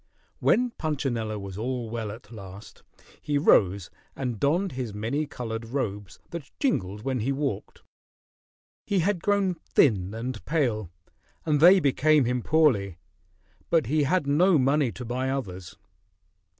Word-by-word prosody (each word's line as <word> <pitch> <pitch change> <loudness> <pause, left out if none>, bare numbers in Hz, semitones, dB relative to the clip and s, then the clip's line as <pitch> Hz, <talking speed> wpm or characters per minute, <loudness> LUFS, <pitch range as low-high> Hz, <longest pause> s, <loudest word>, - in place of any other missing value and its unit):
When 245 +1 +2
Punchinello 130 - -2
was 100 -1 -7
all 125 0 -3
well 115 -3 -3
at 110 +1 -12
last; 100 -2 -11 0.4
he 145 -1 0
rose 100 - +3 0.2
and 125 -5 -3
donned 170 +7 +1
his 125 -5 -5
many 120 +9 -2
colored 115 -5 -5
robes 105 - -4
that 170 -5 -7
jingled 105 - -1
when 130 -1 -1
he 120 +5 -1
walked. 135 -7 -4 1.0
He 195 -3 +2
had 185 0 0
grown 200 -2 +1
thin 105 - +1
and 115 0 -5
pale, 120 - 0 0.6
and 150 -2 +2
they 180 +5 +8
became 150 -1 +3
him 125 +1 0
poorly, 115 - +2 0.7
but 165 -5 +3
he 150 +6 +1
had 150 +3 +1
not 155 +2 +4
money 135 -1 +2
to 125 - -8
buy 130 +3 -2
others. 95 -10 -5
130 Hz, 140 wpm, -26 LUFS, 110-155 Hz, 1.0 s, they